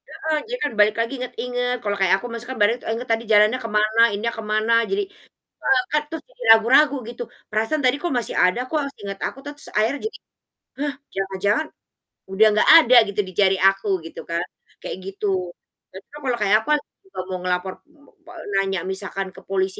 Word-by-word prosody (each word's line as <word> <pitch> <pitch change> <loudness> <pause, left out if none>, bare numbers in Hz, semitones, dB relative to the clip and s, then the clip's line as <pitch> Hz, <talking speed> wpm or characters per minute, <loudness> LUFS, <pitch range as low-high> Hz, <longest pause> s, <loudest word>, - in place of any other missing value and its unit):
Heeh, 315 -1 -2 0.2
jadi - - -1
kan - - 0
balik 210 0 +5
lagi, 230 +3 -3
inget-inget 245 0 -3
kalo 205 -1 -1
kayak 190 -1 +3
aku 245 - -6
masuknya 240 +3 -5
bare 205 +2 +5 0.2
inget 240 +2 -5
tadi 225 0 +1
jalannya 210 +3 +5
ke 230 - -4
mana, 215 +2 +2
ininya 220 +3 -2
ke 225 - -5
mana, 215 +2 +2 0.2
jadi 400 +1 0 0.7
eee 395 -2 +4
kan 300 - +3
terus 325 - -6
jadi - - -16
ragu-ragu, 265 +6 +4
gitu. 240 0 -6 0.3
Perasaan 220 +8 0
tadi 255 +2 +3
kok 350 - -1
masih 235 - -3
ada 180 +6 +2
kok 310 - +1 0.2
seinget 200 -1 -7
aku, - - -6
terus 290 0 -7
akhirnya 220 +7 +1
jadi, - - -12 0.6
"Hah, 290 0 -1 0.2
jangan-jangan, 195 +8 -1 0.7
udah 200 +3 +4
gak - - +3
ada 250 -1 +4
gitu 200 +1 -5
di - - -8
jari 195 -1 +4
aku," 195 +2 -5 0.2
gitu 165 - -8
kan, 170 +1 -1 0.4
kayak - - -5
gitu. 195 +2 -4 0.7
Jadi 190 - -10
kalau 275 -4 -2
kayak 205 0 +4
apa, - - 0 0.4
kalau 185 - -5
mau 185 - -3
ngelapor 180 +1 -1 0.5
pol - - -11 0.2
nanya 195 -1 -1
misalkan 195 0 -4
ke - - -11
polisi 190 -1 -1
220 Hz, 190 wpm, -22 LUFS, 195-255 Hz, 0.7 s, balik